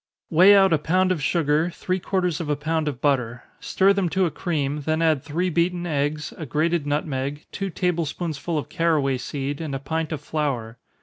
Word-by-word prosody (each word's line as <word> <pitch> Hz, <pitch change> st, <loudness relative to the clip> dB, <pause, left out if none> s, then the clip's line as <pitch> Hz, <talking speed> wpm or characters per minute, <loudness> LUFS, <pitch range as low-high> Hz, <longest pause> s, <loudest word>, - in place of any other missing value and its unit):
_ -, -, -4 dB
Weigh 190 Hz, +5 st, +8 dB
out 195 Hz, -3 st, +5 dB
a 155 Hz, -, +3 dB
pound 185 Hz, +5 st, +2 dB
of 170 Hz, -5 st, -1 dB
sugar, 155 Hz, +2 st, +1 dB
three 185 Hz, +2 st, -3 dB
quarters 180 Hz, -3 st, -1 dB
of 155 Hz, -, -5 dB
a 150 Hz, -, +2 dB
pound 155 Hz, +1 st, -1 dB
of 140 Hz, -5 st, -3 dB
butter 125 Hz, -4 st, 0 dB, 0.2 s
stir 195 Hz, +1 st, +3 dB
them 195 Hz, -3 st, 0 dB
to 190 Hz, +2 st, +1 dB
a 165 Hz, -, -1 dB
cream, 150 Hz, -4 st, -2 dB
then 155 Hz, +2 st, 0 dB
add 160 Hz, -4 st, +2 dB
three 175 Hz, +6 st, -2 dB
beaten 175 Hz, +1 st, 0 dB
eggs, 150 Hz, -1 st, -2 dB
a 160 Hz, -, -4 dB
grated 155 Hz, +3 st, 0 dB
nutmeg, 145 Hz, -1 st, -2 dB
two 195 Hz, -1 st, -3 dB
table 175 Hz, -2 st, 0 dB
spoonsful 160 Hz, +1 st, -3 dB
of 150 Hz, -, -3 dB
caraway 155 Hz, -6 st, +1 dB
seed, 140 Hz, +3 st, -4 dB
and 150 Hz, -4 st, -3 dB
a -, -, -3 dB
pint 160 Hz, +4 st, -3 dB
of 155 Hz, -, -3 dB
flour. 125 Hz, -7 st, -3 dB
155 Hz, 205 wpm, -24 LUFS, 145-175 Hz, 0.2 s, Weigh